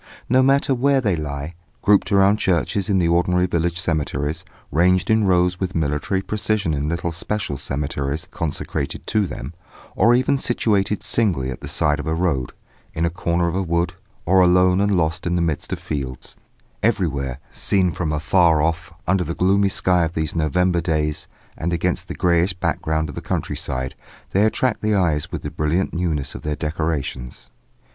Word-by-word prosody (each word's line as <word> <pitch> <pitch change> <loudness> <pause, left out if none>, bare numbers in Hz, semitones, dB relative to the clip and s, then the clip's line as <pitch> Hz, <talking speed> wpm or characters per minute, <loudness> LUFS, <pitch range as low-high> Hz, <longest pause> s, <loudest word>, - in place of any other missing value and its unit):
No 130 +2 +4
matter 135 +1 +3
where 135 +2 +3
they 105 -8 +1
lie, 75 0 -5 0.3
grouped 105 0 +3
around 100 +1 +5
churches 95 0 0
in 100 - +3
the 85 -2 +2
ordinary 90 +1 +2
village 85 -1 -1
cemeteries, 75 -3 -2 0.3
ranged 90 +5 +3
in 110 -1 +3
rows 90 -1 +2
with 95 -1 -3
military 80 +5 -1
precision 105 -5 0
in 75 +1 -1
little 85 +1 -2
special 85 -1 -3
cemeteries 70 +2 -3
consecrated 75 -3 -3
to 105 -3 +1
them, 70 -1 -7 0.4
or 120 +2 +5
even 130 +2 +2
situated 105 -5 +1
singly 85 - +1
at - - -8
the - - -7
side 75 -1 +1
of 75 - -5
a 80 - 0
road, 80 -8 0 0.4
in 80 +1 +1
a 85 - 0
corner 85 0 0
of 85 - -1
a 95 - 0
wood, 85 0 0 0.3
or 95 +2 +5
alone 90 +1 +4
and 100 -1 +2
lost 80 -1 0
in 85 - 0
the - - +1
midst 80 -3 -2
of - - -1
fields, 65 -4 -5 0.5
everywhere, 70 - 0
seen 95 -3 +2
from 80 0 -2
afar 80 +1 +3
off, 80 +2 -1 0.2
under 95 0 +2
the 85 - -4
gloomy 100 +2 +3
sky 90 -2 +2
of 80 +1 -3
these 80 -1 -2
November 85 +3 +1
days 75 -2 -1 0.3
and 85 +2 -2
against 85 - -1
the - - -6
greyish 90 +1 +2
background 80 -2 -1
of 75 - -7
the - - -6
countryside, 65 0 -3 0.4
they 100 +3 +3
attract 125 +3 0
the 110 0 +1
eyes 80 -6 +1
with - - -5
the - - -4
brilliant 80 +5 0
newness 80 -6 -1
of - - -8
their 75 0 -2
decorations. 70 -6 -3
85 Hz, 180 wpm, -21 LUFS, 75-95 Hz, 0.5 s, around